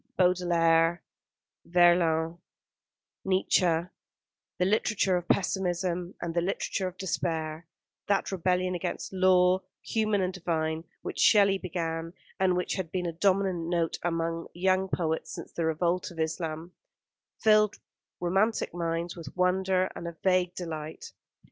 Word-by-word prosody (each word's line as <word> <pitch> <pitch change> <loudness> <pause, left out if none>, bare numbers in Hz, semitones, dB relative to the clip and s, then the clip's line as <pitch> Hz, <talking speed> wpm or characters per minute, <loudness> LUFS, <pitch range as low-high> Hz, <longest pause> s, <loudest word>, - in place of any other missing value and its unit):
Baudelaire, 170 -2 +3 0.6
Verlaine, 170 -1 +3 0.8
Nietzsche, 180 -3 +2 0.7
the 180 - +2
literature 200 -1 +2
of 175 -1 -2
pessimism, 180 -2 0
and 170 -1 -4
the 170 - +1
literature 190 +1 -2
of 185 0 -8
despair, 160 -2 -3 0.4
that 200 0 +1
rebellion 185 0 0
against 175 +2 -4
law, 185 0 +4 0.2
human 215 -2 0
and 185 0 -1
divine, 160 -2 -2 0.2
which - - -5
Shelley 200 -3 +5
began, 165 -2 -3 0.3
and 185 -1 +3
which 180 - -1
had 175 -4 -4
been 180 -1 -2
a 170 - -2
dominant 185 -1 +1
note 170 -2 0
among 165 -1 -2
young 185 +1 +2
poets 160 -3 -2
since - - -8
the 165 - -2
"Revolt 170 +3 0
of 170 -2 -11
Islam" 160 +1 -3 0.7
filled 215 -1 +4 0.4
romantic 195 +5 +1
minds 170 0 -2
with 165 -2 -10
wonder 185 0 +2
and 170 - -6
a 170 -1 -7
vague 180 -1 +2
delight. 160 -3 -6
175 Hz, 130 wpm, -28 LUFS, 165-185 Hz, 0.8 s, Shelley